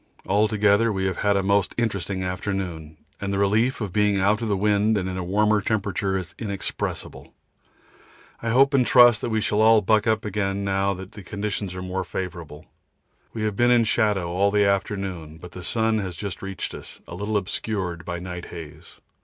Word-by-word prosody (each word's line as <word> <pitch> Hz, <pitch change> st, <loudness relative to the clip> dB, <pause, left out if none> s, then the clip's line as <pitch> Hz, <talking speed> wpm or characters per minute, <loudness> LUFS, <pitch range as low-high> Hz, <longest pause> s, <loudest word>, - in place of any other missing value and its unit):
Altogether 105 Hz, +2 st, +3 dB
we 95 Hz, -2 st, -1 dB
have 95 Hz, -2 st, -1 dB
had 100 Hz, -1 st, +2 dB
a 100 Hz, -, 0 dB
most 100 Hz, 0 st, +1 dB
interesting 100 Hz, -5 st, -1 dB
afternoon, 90 Hz, -4 st, -4 dB, 0.2 s
and 100 Hz, 0 st, -3 dB
the 100 Hz, -, -1 dB
relief 110 Hz, +6 st, +2 dB
of 100 Hz, -5 st, -4 dB
being 105 Hz, 0 st, +2 dB
out 105 Hz, +4 st, +2 dB
of 115 Hz, -, -2 dB
the 100 Hz, -2 st, +1 dB
wind 105 Hz, +2 st, +2 dB
and 95 Hz, -2 st, -2 dB
in 95 Hz, -, -4 dB
a 95 Hz, -, -3 dB
warmer 105 Hz, +3 st, +2 dB
temperature 100 Hz, -2 st, -1 dB
is 90 Hz, -3 st, -6 dB
inexpressible. 100 Hz, -3 st, -5 dB, 1.1 s
I 115 Hz, -, -2 dB
hope 135 Hz, +4 st, +4 dB
and 135 Hz, -2 st, +4 dB
trust 120 Hz, -1 st, +6 dB
we 110 Hz, -2 st, -1 dB
shall 105 Hz, 0 st, +1 dB
all 110 Hz, 0 st, +6 dB
buck 110 Hz, +2 st, +2 dB
up 110 Hz, -1 st, +1 dB
again 100 Hz, -1 st, -1 dB
now 100 Hz, 0 st, 0 dB
that 95 Hz, +1 st, -9 dB
the 105 Hz, -, -10 dB
conditions 100 Hz, -1 st, -4 dB
are 90 Hz, -, -5 dB
more 95 Hz, +1 st, -3 dB
favourable. 85 Hz, -4 st, -6 dB, 0.7 s
We 110 Hz, -, -4 dB
have 105 Hz, -2 st, -1 dB
been 120 Hz, +3 st, +3 dB
in 120 Hz, -1 st, +5 dB
shadow 105 Hz, -6 st, +1 dB
all 100 Hz, +3 st, +2 dB
the 105 Hz, 0 st, +3 dB
afternoon, 95 Hz, -5 st, -2 dB
but 90 Hz, +1 st, -11 dB
the 90 Hz, -, -9 dB
sun 110 Hz, +3 st, 0 dB
has 95 Hz, -4 st, -4 dB
just 100 Hz, +2 st, -6 dB
reached 95 Hz, -1 st, -5 dB
us, -, -, -10 dB
a -, -, -9 dB
little 105 Hz, +4 st, -1 dB
obscured 95 Hz, -3 st, -3 dB
by 85 Hz, -, -4 dB
night 90 Hz, 0 st, -6 dB
haze. 80 Hz, -1 st, -11 dB
100 Hz, 195 wpm, -24 LUFS, 95-105 Hz, 1.1 s, trust